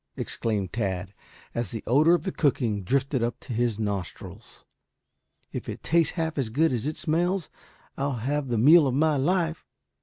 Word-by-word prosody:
exclaimed 105 -5 -2
Tad, 95 -3 -2 0.4
as 120 0 -2
the 115 - -6
odor 155 +8 +5
of - - -3
the 190 - -2
cooking 120 - 0
drifted 135 +4 0
up 120 +1 -2
to 125 - -6
his 115 -2 0
nostrils. 100 -4 -6 0.9
"If - - -5
it - - -7
tastes 165 -1 +2
half 160 -3 -2
as 125 -5 -1
good 150 +5 +2
as 120 +3 -2
it 155 - -3
smells 175 +3 0 0.5
I'll 140 0 0
have 135 +4 -2
the 120 -2 -1
meal 150 +6 +7
of 130 - 0
my 155 +1 +3
life." 165 +3 0
135 Hz, 175 wpm, -26 LUFS, 115-160 Hz, 0.9 s, meal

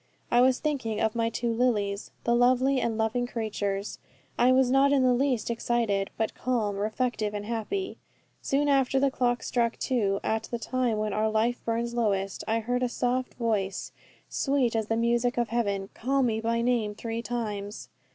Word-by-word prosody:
I 240 - +5
was 255 0 +4
thinking 255 -8 -2
of 220 -1 +1
my 230 -1 0
two 230 0 -1
Lilies, 210 -4 0
the 235 - +2
lovely 255 +2 +3
and 225 -2 -1
loving 225 +2 0
creatures. 205 -4 -3 0.4
I 245 +1 +4
was 255 -1 +4
not 275 +1 +4
in 275 -2 +4
the 250 -1 +4
least 250 -3 0
excited, 225 -4 0
but 220 - -1
calm, 225 -5 -1
reflective, 215 0 -1
and 205 0 -4
happy. 235 - -3 0.4
Soon 285 +2 +1
after 270 -1 +3
the 275 0 +2
clock 245 -2 0
struck 235 -2 0
two, 205 -7 0
at 220 0 -1
the 235 - -4
time 245 -1 -1
when 215 -1 -1
our 215 +1 +1
life 225 +3 0
burns 235 +1 -1
lowest, 195 -5 -1
I 225 +1 +1
heard 245 +3 -1
a 250 - +1
soft 250 +1 -1
voice, 210 -5 -1 0.4
sweet 270 -4 0
as 220 -2 0
the 225 - 0
music 240 +1 +1
of 240 -1 +1
heaven, 200 -4 -1
call 270 +3 0
me 225 -3 0
by 230 +1 0
name 230 -4 +1
three 230 +1 -4
times. 210 -3 -4
235 Hz, 180 wpm, -27 LUFS, 215-250 Hz, 0.4 s, I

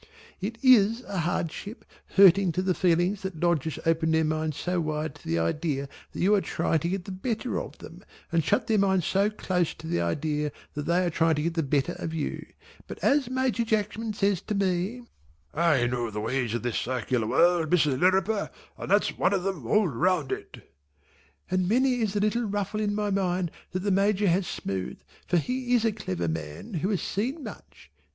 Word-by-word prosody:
It 215 +4 -4
is 230 -3 +6
a 195 -6 -4
hardship 175 +5 -3 0.3
hurting 195 -1 +7
to 185 - -1
the 185 -1 +2
feelings 180 +3 +1
that 190 -4 -5
Lodgers 160 -3 0
open 165 0 +2
their 160 0 +3
minds 155 -1 -1
so 180 -1 -1
wide 155 -1 -2
to - - -15
the 85 - 0
idea 140 - -1 0.2
that - - -8
you 195 +4 +4
are 205 - +4
trying 165 - 0
to 170 - -2
get 190 -1 -3
the - - -6
better 225 +5 -2
of - - -9
them - - -12 0.3
and 165 -1 +2
shut 150 - +1
their 220 -2 +2
minds 190 -3 +2
so 200 +2 +2
close 180 -5 -1
to - - -12
the 85 - 0
idea 150 - -1 0.2
that 150 0 -5
they 175 +2 +2
are 175 - 0
trying 165 0 +2
to 150 - -1
get 170 +1 -1
the 165 - 0
better 145 +3 0
of 165 0 -4
you, 155 - -3 0.4
but - - -7
as 275 -3 +3
Major 255 -2 0
Jackman 220 0 -1
says 200 -3 +1
to 215 - -3
me, 195 +5 -1 0.5
"I 155 -6 +3
know 120 -1 -1
the 105 0 -5
ways 120 +1 -1
of 120 - -3
this 120 -2 -1
circular 125 -2 -1
world 170 +2 +3
Mrs. 150 -6 +2
Lirriper, 190 +4 +2 0.3
and - - -6
that's 205 +2 +2
one 185 - +2
of 190 -2 -1
'em 180 -12 -3
all 210 - +3
round 165 +1 0
it" - - -7 0.8
and 185 -1 +1
many 250 +2 +2
is 210 -3 0
the 205 - 0
little 230 +3 +1
ruffle 205 0 -2
in 205 -1 0
my 210 -1 -1
mind 185 -3 0 0.2
that 185 - -3
the 205 - +1
Major 200 +1 +2
has 180 +1 +1
smoothed, 95 -10 -4 0.2
for 180 - +2
he 250 +6 0
is 230 -1 +2
a 225 - +3
clever 90 - -3
man 80 - -5
who 180 +3 -1
has 200 -4 -1
seen 260 - -2
much. 205 - -11
180 Hz, 205 wpm, -27 LUFS, 155-205 Hz, 0.8 s, hurting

